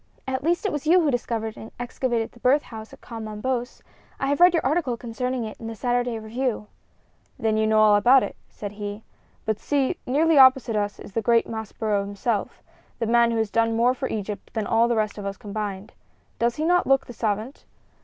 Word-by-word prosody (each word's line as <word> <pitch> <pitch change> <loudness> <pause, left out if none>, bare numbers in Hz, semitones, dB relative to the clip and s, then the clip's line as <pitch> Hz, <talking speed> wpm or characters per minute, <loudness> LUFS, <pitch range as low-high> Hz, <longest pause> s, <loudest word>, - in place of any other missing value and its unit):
"At 260 0 -2
least 345 +5 +1
it 410 - +1
was 295 0 -4
you 355 +3 +6
who 305 -3 +2
discovered 225 -3 -2
and 220 - -10
excavated 240 -2 -2
the 240 - -18
birth 270 +5 +3
house 220 -1 -10
at - - -15
Kom 225 -2 -7
Ombos. 240 +3 -3 0.4
I - - -1
have 285 - 0
read 355 +1 +8
your 330 -5 0
article 275 -4 0
concerning 250 +1 -3
it 215 -1 -7
in 225 - -7
the 225 - -6
Saturday 245 +1 -1
Review." 220 +1 -3 0.7
"Then 220 -1 0
you 220 0 +2
know 220 0 +3
all 215 -1 +6
about 245 +6 +6
it," - - -5
said 205 -1 -7
he. 205 +1 -6 0.4
"But 220 -1 -1
see; 280 -3 0
nearly 305 +3 +4
opposite 260 -3 +6
us 205 -1 -1
is - - -10
the 225 - 0
great 230 +1 +3
Maspero 220 -2 -2
himself 205 +2 -3 0.3
the 230 - -1
man 235 +1 +4
who 230 - -1
has 220 -2 -1
done 230 0 +2
more 240 +2 +3
for 260 +1 -3
Egypt 210 0 -5
than 220 -2 -1
all 225 +2 +3
the 240 - +1
rest 215 -1 -1
of 200 - -6
us 195 0 -5
combined. 205 -1 -5 0.5
Does 235 0 +1
he 310 - -2
not 355 +1 +3
look 270 0 +3
the 245 - -10
savant? 220 +3 -3
230 Hz, 215 wpm, -24 LUFS, 215-260 Hz, 0.7 s, read